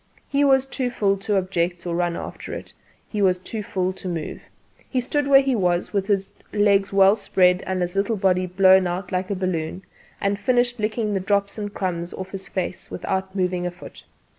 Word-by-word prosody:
He 280 0 +1
was 270 -1 +4
too 260 -2 -2
full 200 -5 +1
to 200 +2 -1
object 180 -2 -1
or 175 - -5
to - - -1
run 175 0 0
after - - -6
it; - - -9 0.3
he 210 - -3
was 185 -2 +4
too 215 +4 -6
full 185 -2 -1
to 185 - -9
move. 165 -3 -5 0.4
He 260 - 0
stood 280 +3 -1
where 275 -1 +7
he 265 -2 +1
was, 180 -3 0
with 200 -1 0
his 195 -2 0 0.2
legs 205 -1 +3
well 195 +1 +6
spread 180 -3 +3
and 190 -1 -1
his 175 +2 -4
little 200 +3 +1
body 185 -1 +2
blown 190 0 +5
out 180 +2 -4
like 185 0 -1
a 200 - -1
balloon, 185 -1 -2 0.4
and 200 0 0
finished 245 +2 +1
licking 215 0 -1
the 195 - +1
drops 200 +2 0
and 205 -1 -4
crumbs 175 -3 -3
off 190 0 -7
his 195 -1 -6
face 185 -1 -4
without 190 0 -3
moving 180 -2 0
a - - -3
foot. 175 - -13
190 Hz, 210 wpm, -23 LUFS, 180-210 Hz, 0.4 s, where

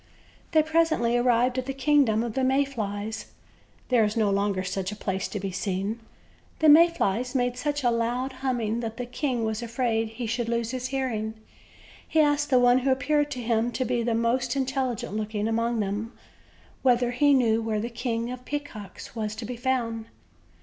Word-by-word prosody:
They 315 -1 +5
presently 315 -7 +2
arrived 245 +1 +2
at 255 - -5
the 270 - -3
kingdom 270 -5 +3
of 235 -2 -4
the 265 - 0
May 265 +2 +3
flies 220 -4 -4 0.6
(there 245 -3 +4
is 210 +1 -1
no 210 -3 +2
longer 200 -1 0
such 190 0 -3
a - - -5
place 190 -2 -2
to 205 - -5
be 195 0 -4
seen): 195 +4 -2 0.6
the 315 - +4
May 325 +3 +9
flies 250 - -1
made 245 -1 +1
such 290 +2 -2
a 240 - +3
loud 240 +3 -1
humming 235 -4 -1
that 225 -1 -5
the 245 - -3
king 245 -1 -2
was 220 0 -2
afraid 230 -1 0
he 225 +2 -6
should 230 +1 -2
lose 235 -1 -1
his 255 -1 -3
hearing. 240 -5 -2 0.7
He 320 - +1
asked 290 -1 +3
the 260 - +5
one 245 0 +5
who 265 +1 0
appeared 295 +3 +2
to 255 -4 -5
him 230 +1 +1
to 255 - -1
be 245 -1 0
the 230 0 0
most 240 +3 0
intelligent 265 -5 -2
looking 215 0 -2
among 230 0 0
them 210 +4 -3 0.7
whether 245 -2 +3
he 285 +4 +3
knew 230 -4 +3
where 220 -1 -1
the 225 - -2
King 235 0 -2
of 250 - -6
the 250 - -24
Peacocks 280 -9 -7
was 215 -2 -3
to 220 +1 -6
be 250 +2 -5
found. 235 -3 -1
240 Hz, 195 wpm, -26 LUFS, 220-260 Hz, 0.7 s, May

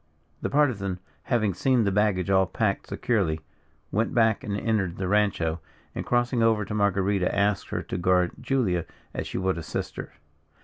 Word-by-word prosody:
The - - -1
Partisan, 115 -11 +1 0.3
having 110 -5 +1
seen 125 +5 +2
the 100 - +1
baggage 100 -2 +1
all 95 -1 +4
packed 100 0 -1
securely, 95 -10 0 0.5
went 110 +3 0
back 110 -2 +3
and 100 -1 -2
entered 100 -7 0
the 95 - -2
rancho, 95 -5 +1 0.3
and - - -4
crossing 120 0 +1
over 110 -2 +3
to 100 - -5
Marguerita 100 -2 +1
asked 100 0 +1
her - - -3
to 95 - -4
guard 90 0 +3
Julia 100 -11 0 0.3
as - - -4
she - - -4
would 95 -2 0
a - - -4
sister. - - -5
100 Hz, 170 wpm, -26 LUFS, 95-110 Hz, 0.5 s, all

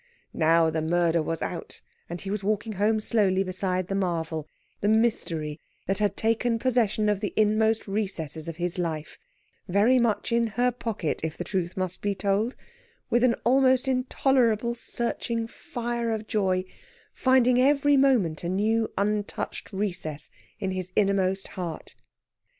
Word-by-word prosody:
Now 165 0 +3
the 160 0 -1
murder 170 0 +2
was 165 +1 -3
out, 175 - -6 0.3
and 175 +1 -5
he 195 - -5
was 205 -1 -3
walking 215 +2 -1
home 210 +3 +2
slowly 200 -3 +2
beside 185 -1 -2
the 195 - -3
marvel, 165 -5 -2 0.3
the 205 - 0
mystery, 165 -9 +1 0.3
that 195 +1 -1
had 205 -1 0
taken 230 +1 +1
possession 225 -4 +1
of 210 -2 +1
the 205 -1 -4
inmost 220 +1 +2
recesses 175 -7 -3
of 165 - -5
his 175 +1 -3
life 160 -3 -4 0.5
very 210 +7 +4
much 235 -1 0
in 235 0 +2
her 250 +1 +3
pocket, 225 -11 -3
if 160 -1 -3
the - - -3
truth 185 -2 -3
must 185 -1 -3
be 205 -1 -1
told 205 +5 0 0.6
with 240 +1 +3
an 250 -2 +4
almost 260 +1 +4
intolerable 255 -3 +2
searching 235 0 -2
fire 235 0 -4
of 220 -1 -3
joy 190 -4 0 0.5
finding 255 -1 +4
every 285 +1 +4
moment 245 - +3
a 170 - -2
new 220 +4 +1
untouched 205 +2 -2
recess 180 -7 -4 0.3
in 190 - -2
his 185 -1 -4
innermost 195 -1 +1
heart. 175 -4 -6
205 Hz, 150 wpm, -26 LUFS, 180-230 Hz, 0.6 s, very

